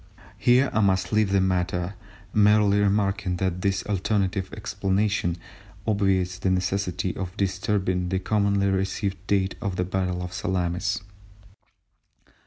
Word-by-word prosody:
Here 125 +2 +4
I - - +2
must 95 -2 +1
leave 105 -2 +3
the 100 - +4
matter, 90 -1 0 0.4
merely 105 -1 +4
remarking 100 -2 +1
that 90 0 -2
this 95 0 0
alternative 100 -1 -1
explanation 95 -3 -1 0.5
obviates 95 -3 +1
the 95 - 0
necessity 95 0 -1
for 95 -2 -4
disturbing 95 -2 0
the 95 - 0
commonly 100 0 +1
received 95 0 -1
date 95 -1 +1
of 100 -2 -2
the 90 - 0
battle 90 -1 -2
of 90 0 -6
Salamis. 90 0 -1
95 Hz, 125 wpm, -25 LUFS, 90-100 Hz, 0.5 s, Here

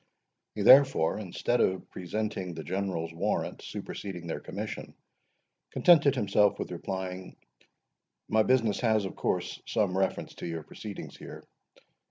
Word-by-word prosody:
He, - - -2
therefore, 135 - +6
instead 110 +4 -1
of 95 0 0
presenting 95 -1 -3
the 80 - -6
General's 90 -4 -3
warrant 85 - -2
superseding 90 -4 -6
their 85 - -3
commission, - - -6 0.7
contented 145 -5 +5
himself 105 -3 +3
with - - -5
replying,—"My 95 - -5
business 115 -3 +2
has, 110 -4 +2
of 95 - -6
course, - - -2
some 100 -4 +1
reference 95 0 -1
to - - -5
your 80 -2 -4
proceedings 100 +5 -8
here. - - -10
95 Hz, 125 wpm, -29 LUFS, 90-110 Hz, 0.7 s, therefore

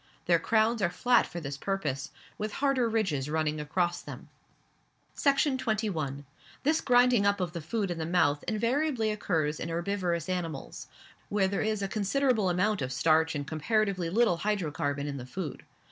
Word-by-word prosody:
Their 170 -1 +4
crowns 220 +4 +2
are 180 - +3
flat 245 +7 +3
for 175 - -6
this 140 -3 -5
purpose, 150 -7 -2 0.3
with 215 0 -3
harder 270 -4 +1
ridges 175 -12 0
running 155 -1 0
across 175 +4 -1
them. - - -10 0.8
Section 275 -1 +2
21. 165 - -2 0.4
This 310 +3 +2
grinding 245 -3 +4
up 200 0 +2
of 175 -2 -2
the 170 - -4
food 195 +4 -2
in 170 - -4
the 160 - -2
mouth 155 -4 +2
invariably 230 +1 +1
occurs 160 -7 -1
in 165 - -4
herbivorous 170 -1 -1
animals, 170 -6 -4 0.4
where 200 -2 +2
there 195 +1 -1
is 215 -2 -1
a - - 0
considerable 215 +1 +1
amount 185 +3 +1
of 130 -1 -2
starch 160 +4 +2
and 145 -1 -3
comparatively 185 +3 0
little 210 -3 +2
hydrocarbon 150 -8 -1
in 145 -1 -4
the 125 -1 -7
food. 150 -1 -5
185 Hz, 165 wpm, -29 LUFS, 155-220 Hz, 0.8 s, Their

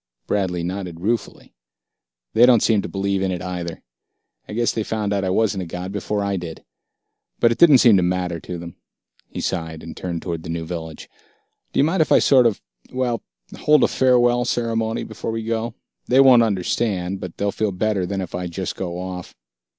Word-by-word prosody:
Bradley 90 -4 -1
nodded 90 -2 -5
ruefully. 110 +2 -3 0.8
"They 120 +2 +6
don't 120 -4 +5
seem 110 -3 +3
to - - -6
believe 100 0 -1
in 95 -1 0
it, 90 - -4
either. 90 -2 -5 0.7
I - - -6
guess 120 +1 +1
they 110 - -2
found 105 -1 -2
out 100 -1 0
I 95 - 0
wasn't 95 0 +1
a 90 - -5
god 90 +3 -5
before 100 +1 -2
I 100 -1 -1
did. 85 -2 -7 0.7
But 115 - +4
it 115 - -2
didn't 155 -6 +8
seem 115 -5 +6
to - - +3
matter 90 -1 -1
to 90 +2 -6
them." 85 0 -9 0.5
He - - -6
sighed, 80 -3 -3
and 80 - -8
turned 85 -3 -4
toward 85 -3 -4
the 80 - -9
new 80 0 -3
village. 80 -2 -7 0.6
"Do - - -1
you - - +6
mind, 165 +3 +2
if 155 - +1
I - - +7
sort 130 -4 +5
of 110 - -3 0.3
well, 125 -3 -1 0.4
hold 150 -2 +4
a - - +5
farewell 120 -1 +3
ceremony 115 -2 -1
before - - -6
we 115 0 -3
go? 115 0 -2 0.3
They 130 - +4
won't 130 -3 +7
understand, 95 -2 -1
but 90 -3 -8
they'll 100 0 0
feel 110 0 -1
better 95 -1 -1
than 95 +1 -2
if 90 - -7
I 90 0 -3
just 90 +2 -4
go 90 -2 -4
off...." 90 0 -7
100 Hz, 205 wpm, -22 LUFS, 90-115 Hz, 0.8 s, didn't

